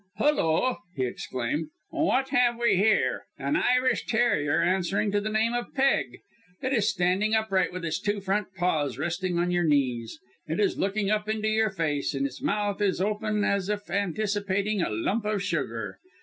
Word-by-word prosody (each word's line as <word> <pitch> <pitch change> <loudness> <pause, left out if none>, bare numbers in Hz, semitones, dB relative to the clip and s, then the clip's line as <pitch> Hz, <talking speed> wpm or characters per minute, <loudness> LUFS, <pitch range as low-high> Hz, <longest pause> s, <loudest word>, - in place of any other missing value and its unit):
"Hulloa!" 255 - +2 0.2
he 130 - 0
exclaimed. 130 +5 -3 0.2
"What 270 -5 +1
have 245 -3 +3
we 235 -4 +3
here 210 +4 +2
an 295 - -1
Irish 255 -2 +2
terrier 220 -11 +2
answering 190 +3 +1
to 205 0 +1
the 215 - -2
name 220 +2 +1
of 240 0 -4
'Peg.' 275 0 +1 0.4
It 260 +1 -1
is 220 -5 +2
standing 190 +4 +1
upright 220 -4 +1
with 180 -1 -5
its 160 -1 -1
two 205 0 -1
front 195 +1 -1
paws 155 -8 0
resting 175 +4 -2
on 175 +1 +1
your 175 0 +2
knees. 130 -7 0 0.3
It 160 +4 -2
is 205 - +1
looking 200 +1 0
up 215 0 0
into 215 0 0
your 220 0 +2
face, 150 -7 -1
and 135 0 0
its 135 -2 -5
mouth 205 -1 -1
is 195 -3 +1
open 210 +1 0
as 200 -1 0
if 205 -3 -3
anticipating 200 +1 0
a - - 0
lump 190 - -1
of 210 -2 -1
sugar. 195 - -3
200 Hz, 175 wpm, -27 LUFS, 175-215 Hz, 0.4 s, have